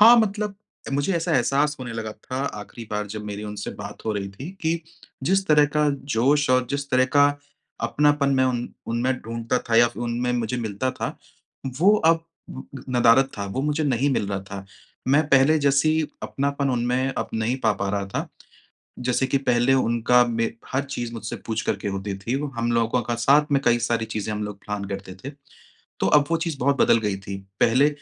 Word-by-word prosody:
हाँ, 230 +3 +9
मतलब 210 -2 +1 0.4
मुझे 145 +7 +1
ऐसा 165 0 -1
एहसास 140 +4 +1
होने 120 -2 -5
लगा 110 -1 -4
था 130 - -8 0.2
आखिरी 115 +2 -10
बार 105 0 -2
जब 105 +1 -6
मेरी 105 0 -5
उनसे 105 -1 -5
बात 100 - -8
हो 110 - 0
रही 100 -1 -3
थी 135 - -8
कि 165 0 0 0.4
जिस 190 +5 +1
तरह 150 -1 +6
का 150 -1 +4 0.3
जोश 140 +5 +3
और 130 -1 +3
जिस 140 0 -2
तरह 130 0 +4
का 145 0 +7 0.6
अपनापन 145 -1 +2
मैं 130 0 +3
उन 120 -2 -1 0.2
उनमें 120 +3 0
ढूँढता 115 +2 -2
था 115 - +3
या 120 0 +6
उनमें 120 +1 -1
मुझे 120 0 -1
मिलता 115 +2 -2
था, - - -5 0.6
वो 190 +5 +6
अब 165 -2 +3 0.7
नदारद 125 +2 +5
था, 100 - -2
वो 130 +8 -3
मुझे 150 +1 0
नहीं 135 +1 +1
मिल 105 - 0
रहा 100 -1 -2
था। 100 0 -6 0.4
मैं 145 +3 +5
पहले 140 +4 +5
जैसी 145 +3 +3 0.2
अपनापन 140 0 -1
उनमें 125 +2 0
अब - - -2
नहीं 110 +3 0
पा 110 -2 +3
पा 100 0 -3
रहा 100 -1 -2
था। 95 - -4 0.7
जैसे 125 +1 0
कि 140 - +1
पहले 125 0 +2
उनका 120 0 +3
मे 115 -1 0 0.3
हर 130 - +1
चीज़ 120 -4 -5
मुझसे 110 -1 -5
पूछ 110 -1 -1
करके 105 - -1
होती 100 0 -3
थी। 115 +5 -4 0.2
हम 120 +1 0
लोगों 115 +1 +1
का 120 - -2
साथ 140 +5 +3
में 140 - +4
कई 120 0 +4
सारी 115 -1 0
चीज़ें 110 0 -3
हम 105 0 -3
लोग 105 -1 -6
प्लान 105 -1 -4
करते 95 -1 -6
थे। 140 - -4 0.7
तो - - +2
अब 145 -1 +5
वो 165 - +3
चीज़ 160 -5 -3
बहुत 140 +2 +2
बदल 115 - +5
गई 105 -3 -1
थी। 100 0 -6 0.2
पहले 130 +5 +5
125 Hz, 195 wpm, -24 LUFS, 110-140 Hz, 0.7 s, हाँ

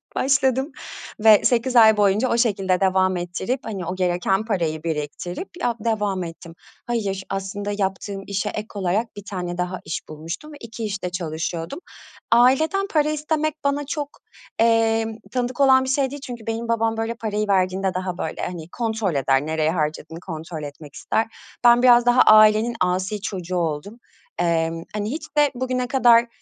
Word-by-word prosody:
başladım 265 +1 +1 0.5
ve 215 -1 +7
8 245 +1 +1
ay 220 -2 +7
boyunca 205 +5 +3
o 235 - +1
şekilde 195 -6 +1
devam 185 -1 +2
ettirip, 190 +9 -3
hani, 195 -6 -5
o 185 +2 -3
gereken 185 +3 0
parayı 165 -7 -1
biriktirip 165 - -4
ya 235 -1 0
devam 210 -4 -1
ettim. 165 0 -9 0.3
Hayır, 200 -5 -2
aslında 195 +1 -4
yaptığım 195 0 -3
işe 200 -2 -2
ek 215 +1 -5
olarak 200 +4 -1
1 205 - -8
tane 180 -2 -4
daha 180 0 -3
iş 155 - -3
bulmuştum 165 - -7
ve - - -10
2 230 0 -7
işte 195 -3 -3
çalışıyordum. 165 - -4 0.5
Aileden 310 +12 +4
para 305 -1 +3
istemek 305 0 -1
bana 280 0 0
çok, 290 -1 -3 0.5
eee, 225 -1 +3 0.3
tanıdık 250 +1 -2
olan 260 -1 +6
bir 260 - -3
şey 270 0 +1
değil 285 -1 -7
çünkü 235 -3 -8
benim 225 +1 -3
babam, 225 -1 0
böyle, 225 +1 -2
parayı 215 -2 -2
verdiğinde 190 -1 +1
daha, 185 -1 -3
böyle, - - -4
hani, 170 -2 -5
kontrol 220 -7 -2
eder, 135 +1 +2
nereye 160 0 0
harcadığını 160 0 -3
kontrol 160 -2 -7
etmek 145 0 -10
ister. 225 - -1 0.4
Ben 240 +1 +6
biraz 240 -1 +6
daha 245 +1 +5
ailenin 215 +2 +6
asi 185 +3 0
çocuğu 185 -3 -4
oldum. 170 +7 -3 0.4
Emm, 165 -1 0
hani, 210 +2 -2
hiç 305 +1 -4
de 295 -1 +4
bugüne 255 0 -2
kadar 240 -3 +5
205 Hz, 165 wpm, -22 LUFS, 180-240 Hz, 0.5 s, ve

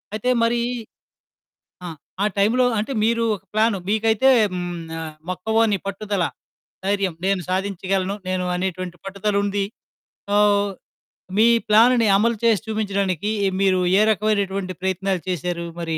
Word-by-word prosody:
అయితే 220 +4 -1
మరి 235 +1 +2 1.2
ఆ! - - -4 0.4
ఆ - - +3
టైంలో 225 +6 +3
అంటే 220 +6 -3
మీరు 230 +1 +2
ఒక 190 - -14
ప్లాను. 215 -1 +2
మీకైతే 220 +4 +3 0.2
హ్మ్. 180 -1 -3 0.3
ఆహ్, 160 -1 -7
మొక్కవోని 220 +3 +1
పట్టుదల, 200 -1 -2 0.6
ధైర్యం, 195 -2 0
నేను 195 -1 +1
సాధించగలను 195 0 -1
నేను 185 -1 -1
అనేటువంటి 185 -1 -3
పట్టుదలుంది. 200 0 -1 0.6
సో, 205 - +2 1.0
మీ 225 - +6 0.2
ప్లానుని 230 +2 +5
అమలు 230 +2 +1
చేసి 225 -4 +3
చూపించడానికి 200 -3 -1 0.3
మీరు 190 -1 +3 0.2
ఏ - - +5
రకమైనటువంటి 200 -2 -1
ప్రయత్నాలు 190 0 -1
చేశారు 175 -1 -2 0.2
మరి? 165 -1 -2
200 Hz, 120 wpm, -22 LUFS, 185-215 Hz, 1.2 s, మీ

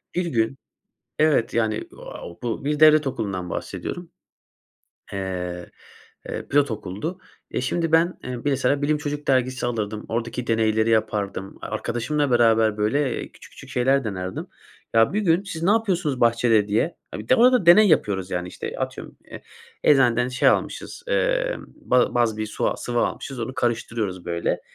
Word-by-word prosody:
bir 180 0 0
gün 120 -4 0 0.6
evet, 150 -7 +3
yani, 110 -2 +1
eee, - - -6 0.5
bu 120 +2 -3
bir 150 +1 -1
devlet 155 -1 +7
okulundan 100 -8 -3
bahsediyorum, 175 - -5 1.0
eee, 90 -2 -4 0.6
eee, - - -5
pilot 145 -2 +3
okuldu. 110 - -5 0.3
E, - - -1
şimdi 165 +5 -1
ben, 165 +2 +3
eee, 125 -1 -4
mesela 140 0 +1
bilim 150 +1 +1
çocuk 145 0 -5
dergisi 130 -1 +1
alırdım, 110 -3 -3
oradaki 120 +1 -3
deneyleri 110 0 +2
yapardım. 105 -3 -1
Arkadaşımla 145 +4 -2
beraber, 115 -2 +4
böyle, 120 +5 0
küçük - - -16
küçük - - -13
şeyler 135 +2 +2
denerdim. 95 -4 -4 0.5
Ya, 115 +8 +4
bir 210 - +1
gün 180 0 +2
siz 165 -5 -6
napıyorsunuz 185 - +1
bahçede 115 -2 +3
diye. 110 +11 0 0.2
Ya - - -5
bir 110 - -10
de - - +6
orada 250 -4 +5
deney 205 +5 +8
yapıyoruz, 95 - +1
yani, 90 0 -2
işte, - - -6
atıyorum, - - -5
eee, - - -11 0.4
eczaneden 125 -4 +4
şey 125 +1 +3
almışız, - - -2
eee, - - +1
ba 125 - 0
baz 115 -3 +2
bir 110 0 -2
su - - -1
sıvı 120 -1 -2
almışız 135 +1 -3
onu 115 +3 -4
karıştırıyoruz 115 -6 -2
böyle. 85 0 -1
120 Hz, 155 wpm, -23 LUFS, 110-150 Hz, 1.0 s, deney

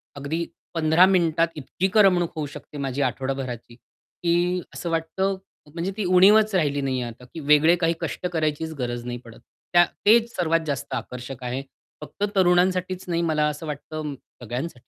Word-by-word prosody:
अगदी 150 +4 -3 0.3
15 165 +2 +5
मिनिटात 170 -3 +3
इतकी 155 +6 -2
करमणूक 185 -5 +4
होऊ 155 -2 -2
शकते 150 - -10
माझी 140 0 -2
आठवडाभराची. 130 -4 -3
की 175 +7 -2
असं 170 - -4
वाटतं 165 +4 -1 0.4
म्हणजे 170 +3 -2
ती 215 - -1
उणीवच 200 +4 +6
राहिली 145 -5 +1
नाहीये 130 -2 -1
आता, 120 +1 -8
की 165 - -6
वेगळे 150 +3 +5
काही 165 -1 +1
कष्ट - - -4
करायचीच 160 0 -1
गरज 120 -1 -3
नाही 120 0 -4
पडत. 115 -1 -13 0.3
त्या 175 0 +7 0.2
तेच 230 +2 +5
सर्वात 165 -2 +2
जास्त 140 -4 -3
आकर्षक 125 +1 -6
आहे. 125 +2 -3 0.4
फक्त 150 +6 -7
तरुणांसाठीच 185 0 +2
नाही, 170 -1 0
मला 155 -3 +1
असं 150 +2 -4
वाटतं 150 0 -5 0.3
सगळ्यांसाठी. 125 +6 -4
160 Hz, 155 wpm, -24 LUFS, 140-180 Hz, 0.4 s, त्या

